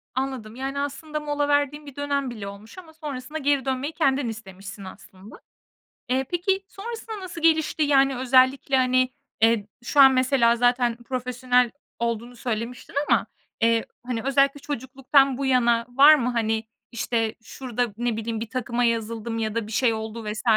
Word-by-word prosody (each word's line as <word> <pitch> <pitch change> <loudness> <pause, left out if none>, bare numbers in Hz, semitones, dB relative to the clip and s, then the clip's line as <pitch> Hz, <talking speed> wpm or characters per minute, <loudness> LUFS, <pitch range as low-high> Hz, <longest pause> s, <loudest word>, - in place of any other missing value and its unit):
Anladım, 260 -4 -3
yani, 270 +2 -4
aslında 300 +2 -4
mola 290 -1 -1
verdiğin 290 +1 +1
bir 280 - -11
dönem 280 -2 -1
bile 215 -4 -7
olmuş 200 - -11
ama 335 -4 -12
sonrasında 300 -2 -6
geri 280 -2 +1
dönmeyi 265 +3 -2
kendin 270 -6 +1
istemişsin 195 -2 -9
aslında. 190 +1 -13 0.7
Eee, 260 +1 +1
peki, 385 +3 0
sonrasında 445 0 -7
nasıl 355 -3 -8
gelişti? 315 -1 +2
Yani, 275 -2 +3
özellikle, 260 +1 +3
hani, 255 0 +3 0.3
eee, 225 -2 +3 0.2
şu 285 +4 0
an 270 -1 +10
mesela 255 -2 +3
zaten 245 0 +2
profesyonel 250 -1 +1 0.3
olduğunu 235 +1 -3
söylemiştin 235 +2 -5
ama, - - +3 0.4
eee, 230 0 +3 0.2
hani, 245 -2 -2
özellikle 275 +1 +2
çocukluktan 270 0 +1
bu 275 - -2
yana 240 -3 +3
var 280 +5 +8
mı, 250 -4 0
hani, 225 -2 0 0.3
işte, 225 -1 -1
şurada 245 -3 -3
ne 240 -2 -1
bileyim, 225 0 -3
bir 225 0 -5
takıma 245 -1 -2
yazıldım 230 -1 -1
ya 220 -1 -2
da 230 -2 -2
bir - - -9
şey 230 +1 +2
oldu 220 +1 -5
vs. 210 +1 -4
255 Hz, 160 wpm, -24 LUFS, 230-280 Hz, 0.7 s, an